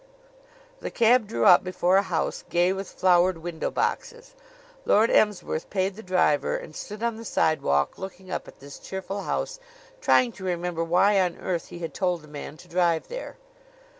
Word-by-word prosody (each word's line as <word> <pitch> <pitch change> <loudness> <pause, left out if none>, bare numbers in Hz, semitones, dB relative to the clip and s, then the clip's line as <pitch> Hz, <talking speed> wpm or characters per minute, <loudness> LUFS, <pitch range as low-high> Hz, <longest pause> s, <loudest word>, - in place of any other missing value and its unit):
The - - -5
cab 235 -1 +3
drew 220 - -1
up 180 -3 +7
before 185 0 +2
a - - +5
house 185 -4 -2
gay 175 +2 +2
with 195 0 -6
flowered 180 -1 +3
window 165 0 -4
boxes. 480 +1 -3 0.5
Lord 220 - +4
Emsworth 210 -6 +1
paid 190 -1 -1
the 220 - -9
driver 180 -6 +1
and 155 - -10
stood 210 +2 -7
on 235 -1 -1
the 230 - -8
sidewalk 70 - +1
looking 190 -1 -8
up - - -4
at - - -14
this 140 0 -11
cheerful 190 +1 -5
house, - - -3 0.4
trying 255 - +4
to 200 - -12
remember 175 -2 -2
why 195 +4 +3
on 180 -2 -1
earth 175 -3 -3
he - - -9
had 165 -1 -6
told 180 -4 -1
the - - -14
man 150 0 -8
to 180 - -15
drive 175 -2 +1
there. - - -7
185 Hz, 180 wpm, -25 LUFS, 170-205 Hz, 0.5 s, up